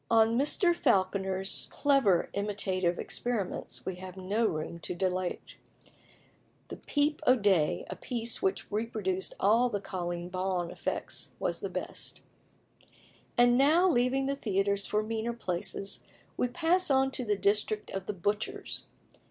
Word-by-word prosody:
On 225 0 +4
Mr. 320 +7 +3
Falconer's 190 - +2
clever 270 - +3
imitative 190 -3 0
experiments 225 -7 -3
we 185 -1 -3
have 185 0 -9
no 205 +5 +1
room 155 0 -4
to 175 - -4
dilate. 185 0 -2 1.1
The - - -6
"Peep 295 +1 0
o' 255 - +7
Day," 195 -9 +2
a - - -5
piece 235 -2 -1
which 190 - -1
reproduced 205 -4 -2
all 230 +5 +4
the 205 -3 -2
"Colleen 175 -2 -4
Bawn" 185 -1 -2
effects, - - -3
was - - -2
the - - -4
best. - - -6 1.2
And 245 +1 +5
now 320 +7 +5
leaving 265 -3 +2
the 275 +1 0
theatres 200 -5 0
for 210 0 +1
meaner 225 +2 -2
places, 195 -2 -3 0.3
we 250 - +1
pass 340 +8 +2
on 270 -1 +3
to 265 - -4
the 210 -3 0
district 210 +1 0
of 195 0 -5
the 210 - -2
butchers. 205 +3 -2
210 Hz, 140 wpm, -30 LUFS, 185-245 Hz, 1.2 s, o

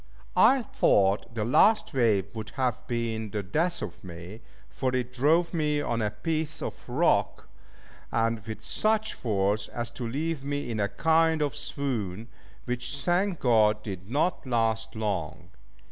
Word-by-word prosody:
I 260 +1 +5
thought 100 - +2
the 110 -2 -1
last 215 - +4
wave 115 -7 +2
would 110 -2 -6
have 125 -1 -1
been 115 -2 -2
the 105 0 -3
death 165 - 0
of - - -7
me, 90 +5 -9 0.3
for 130 -1 -2
it 125 0 -2
drove 160 +7 +2
me 150 -3 +1
on 120 -5 -1
a 105 - +1
piece 155 +5 -2
of - - -7
rock, - - +1 0.6
and 115 0 +1
with 110 -1 -6
such 220 - 0
force, 105 -2 0
as 120 0 -5
to 120 0 -5
leave 150 +3 -2
me 145 -3 -3
in 110 - -2
a 100 0 +1
kind 160 +7 +3
of 145 -1 -2
swoon, 125 - -3 0.4
which, 125 +3 -3
thank 180 +2 +1
God, 105 -3 +3
did 95 -2 -7
not 155 +4 0
last 115 -2 0
long. 100 -8 -3
120 Hz, 155 wpm, -27 LUFS, 110-150 Hz, 0.6 s, I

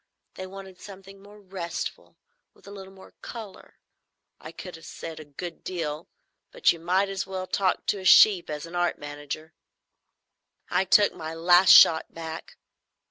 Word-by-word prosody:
They 185 - -8
wanted 190 -1 -11
something 195 0 -13
more 205 +1 -16
restful, 185 -4 -7 0.4
with - - -23
a 200 - -11
little 195 -1 -10
more 190 0 -17
colour. 220 -5 -10 0.6
I - - -10
could 180 -2 -10
have 165 - -14
said 165 -1 -8
a 155 - -10
good 165 +4 -9
deal, 160 -4 -5 0.4
but - - +3
you 170 - -6
might 185 +4 +1
as 195 -1 -4
well 190 -1 -5
talk 190 0 -1
to 205 - -1
a 190 - -10
sheep 190 -2 +6
as 150 +1 -5
an 165 - -12
art 175 0 0
manager. 145 +2 -8 1.2
I 180 +2 +1
took 205 +2 +4
my 160 -1 -7
"Last 175 +3 +6
Shot" 160 -1 +6
back. 160 -1 -8
185 Hz, 165 wpm, -26 LUFS, 165-195 Hz, 1.2 s, sheep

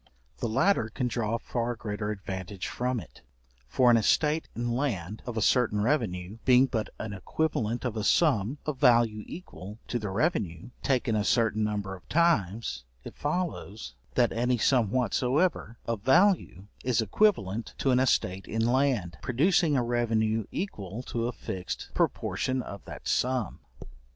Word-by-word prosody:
The 115 - -1
latter 130 - +2
can 125 +3 -2
draw 115 -2 -1
a - - 0
far 120 0 -2
greater 105 -1 -4
advantage 95 -2 -5
from 125 0 -1
it; 85 - -13 0.5
for 125 - +4
an 115 - +6
estate 150 +8 +2
in 120 0 -2
land 110 - -2
of 120 -2 -4
a 110 - +1
certain 120 -5 +3
revenue, 105 -5 -1
being 130 0 +6
but 115 -5 -2
an 110 -2 -5
equivalent 120 +2 -2
of 120 -3 -2
a 110 - -2
sum 130 - +2
of 150 -4 -3
value 115 -5 +4
equal 105 - -9
to 120 - -1
the 105 -2 -4
revenue, 100 - -1
taken 125 -4 +1
a 105 - +1
certain 110 -1 +2
number 105 -2 -2
of 90 - -17
times, 115 - +1 0.2
it - - -8
follows, 150 - -3 0.2
that 120 -2 +3
any 125 +2 +1
sum 120 -2 +3
whatsoever 130 - 0
of 115 -3 -2
value 135 - +3 0.2
is 125 -3 +1
equivalent 110 - +1
to 135 - +1
an 125 - +4
estate 95 -7 +1
in 115 +1 0
land, 120 - +1
producing 150 +3 +2
a 125 - +2
revenue 115 -2 +1
equal 110 - -5
to 115 -2 -2
a - - -1
fixed 95 -6 -6
proportion 130 -1 0
of 100 -2 -9
that - - -9
sum. 125 -6 0
115 Hz, 160 wpm, -28 LUFS, 105-130 Hz, 0.5 s, an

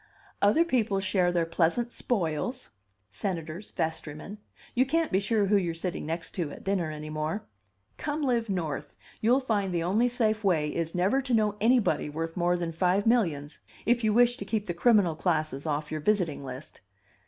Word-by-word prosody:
"Other 210 +12 +4
people 225 -10 +1
share 185 -2 +2
their 170 -1 +1
pleasant 170 +9 +1
spoils 220 - -2 0.4
senators, 170 0 -4
vestrymen 160 +5 -4 0.3
you 255 - +4
can't 320 +5 0
be 190 - +3
sure 210 +1 +1
who 205 +1 +4
you're 170 -4 -1
sitting 170 -2 -4
next 165 +1 -3
to 170 -6 -2
at - - -10
dinner 190 -4 0
any 155 0 -6
more. 155 +7 -2 0.5
Come 300 0 -2
live 235 -4 +1
North. 155 -6 -3 0.3
You'll 240 +4 +4
find 210 -7 0
the 170 -2 0
only 210 +8 +2
safe 220 -3 0
way 160 -6 +2
is 165 0 -2
never 195 +10 +2
to 255 -3 0
know 210 -2 +2
anybody 225 - +3
worth 165 +2 -4
more 175 0 +2
than 170 -1 -3
five 180 +4 +1
millions 165 -12 +1 0.3
if 240 +1 +2
you 215 - +3
wish 245 +2 +4
to - - -5
keep 215 -2 -2
the 175 - -2
criminal 200 -2 +4
classes 155 -3 -1
off 150 0 -2
your 155 -1 -3
visiting 175 -6 +1
list." 130 +2 -9
185 Hz, 180 wpm, -28 LUFS, 160-225 Hz, 0.5 s, Other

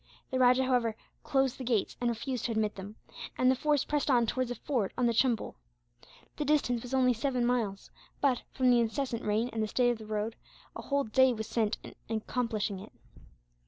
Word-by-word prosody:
The 260 - 0
rajah, 255 +1 +5
however, 245 -4 +1 0.3
closed 270 -1 0
the - - -4
gates 235 -5 0
and 240 - +2
refused 235 +1 -3
to 240 - -1
admit 215 -1 0
them; 200 +2 -9 0.4
and 255 0 +4
the - - +2
force 295 +1 +1
pressed 295 -1 -1
on 240 -3 +4
towards 255 +2 -1
a 245 - -3
ford 240 -9 -1
on 250 - +2
the 235 - +3
Chumbul. 235 -1 +1 0.8
The 300 - -1
distance 280 -5 +1
was 250 +2 -4
only 255 -1 +4
seven 250 +1 0
miles 230 -5 -1 0.3
but, 265 -4 +2
from 255 -1 +3
the 240 - +5
incessant 235 +1 -1
rain 220 +4 0
and 225 - -1
the 215 - 0
state 245 +2 +2
of 235 - -4
the 215 - -10
road, 215 +1 -2 0.4
a - - -5
whole 280 0 0
day 260 +3 +4
was 220 -1 -4
spent 220 -3 0
in 225 - -6
accomplishing 220 -3 -2
it. 210 +3 -11
245 Hz, 205 wpm, -30 LUFS, 220-260 Hz, 0.8 s, rajah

